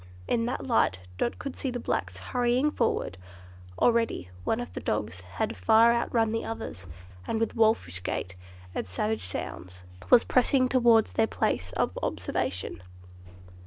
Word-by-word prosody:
In 230 -1 +1
that 250 - -3
light 225 - +2 0.2
Dot 240 - 0
could 275 - -6
see 270 - -2
the 245 0 -3
blacks - - -2
hurrying 250 +4 +1
forward. 230 - -1 0.6
Already 230 - +2
one 225 - 0
of 245 - -6
the - - -4
dogs 105 -4 -2 0.2
had - - -1
far 220 - +5
outrun 230 -1 +1
the 225 - -1
others, 95 - -6 0.4
and 220 - -1
with 225 - -1
wolfish 215 - +2
gait 90 0 -3 0.4
and - - -3
savage 105 +2 -2
sounds, 90 0 -6 0.3
was 245 -2 +7
pressing 255 +1 +3
towards 235 -4 +4
their 225 - +2
place 95 - -1
of - - 0
observation. 90 0 -2
225 Hz, 150 wpm, -28 LUFS, -, 0.6 s, was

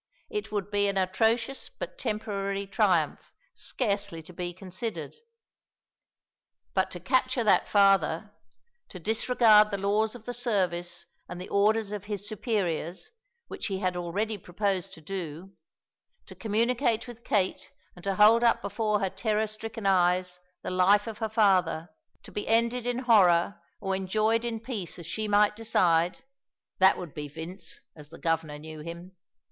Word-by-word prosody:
It 420 -1 -4
would 205 -1 -3
be 205 0 +2
an 200 -1 -1
atrocious 225 +8 +1
but - - -8
temporary 200 -3 -2
triumph 195 - +1 0.2
scarcely 200 -8 -2
to 180 - -13
be 175 0 -4
considered. 185 +5 -6 1.6
But 190 -1 +1
to 180 - -7
capture 255 +5 +1
that 215 - +4
father; 195 -1 +3 0.6
to - - -9
disregard 220 +1 +4
the 200 - -2
laws 210 +3 +1
of 230 -2 -12
the 245 - -4
service 185 -8 -1 0.2
and 175 - -6
the 180 - -7
orders 210 +1 +2
of 205 -1 -5
his 205 -1 -4
superiors, 200 - -2 0.4
which - - -5
he 195 -2 -2
had 185 -2 -1
already 200 +5 -2
proposed 190 +1 -2
to 160 - -14
do; 180 +1 -6 0.7
to - - -11
communicate 230 +1 0
with 235 -1 -11
Kate 190 -3 0 0.2
and 175 - -14
to 195 -1 -1
hold 220 +4 +6
up 235 - +4
before 210 -2 0
her 195 - +1
terror 215 +2 0
stricken 220 +1 -7
eyes 180 -1 +2 0.2
the - - -3
life 195 +3 +4
of 225 -1 -7
her 220 -1 -1
father, 185 -7 +2 0.3
to - - -13
be 210 - -4
ended 235 +2 +2
in 245 0 0
horror 200 -8 +4 0.2
or 195 0 -1
enjoyed 215 +4 +1
in 230 -2 -3
peace 225 -7 -5
as 170 - -9
she 215 +6 -3
might 210 0 +4
decide 180 -1 +2 0.6
that 190 0 +6
would 175 -5 -7
be 150 -1 -5
Vince, 165 +5 -7
as 150 -2 -12
the 165 - -11
Governor 165 -2 -1
knew 155 +1 -9
him. 170 +4 -9
200 Hz, 155 wpm, -28 LUFS, 180-220 Hz, 1.6 s, hold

